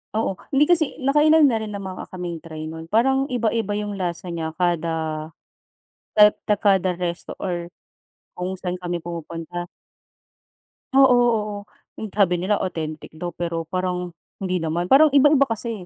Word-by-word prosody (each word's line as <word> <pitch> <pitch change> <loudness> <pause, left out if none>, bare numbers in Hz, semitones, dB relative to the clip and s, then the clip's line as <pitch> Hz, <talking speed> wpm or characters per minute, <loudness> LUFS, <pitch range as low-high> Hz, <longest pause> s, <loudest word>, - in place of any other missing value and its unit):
Oo, 220 -2 0 0.2
hindi, 285 +1 +4
kasi, 325 -3 +2
nakailan 300 +2 +5
na 235 -5 +3
rin 215 - -5
namang 195 -2 -6
kaming 175 -3 -6
try 155 -1 -7
nun 160 +1 -8
parang 265 +6 +2
iba-iba 225 -4 0
yung 210 0 -3
lasa 180 -2 -4
niya 165 -1 -3
kada 175 -2 +1 1.3
et 210 0 +8 0.2
ta 210 - +4
kada 190 -3 +2
resto 175 -1 -4
or 175 -1 -3 0.7
kung 180 +1 -3
saan 180 0 -4
kami 175 -1 -3
pumupunta. 170 +1 -6 1.3
Oo, 270 -1 +7
oo, 225 -4 +2 0.5
yung 220 - -4
tabi 185 -3 +2
nila 200 +3 +1
authentic 155 -4 -5
daw, 175 +3 -5
pero, 170 -1 -3
parang 180 -1 -2 0.3
hindi 185 -1 0
naman, 170 +2 -2
parang 295 +1 +6
iba-iba 285 0 +6
kasi 225 -5 -4
185 Hz, 150 wpm, -23 LUFS, 175-230 Hz, 1.3 s, et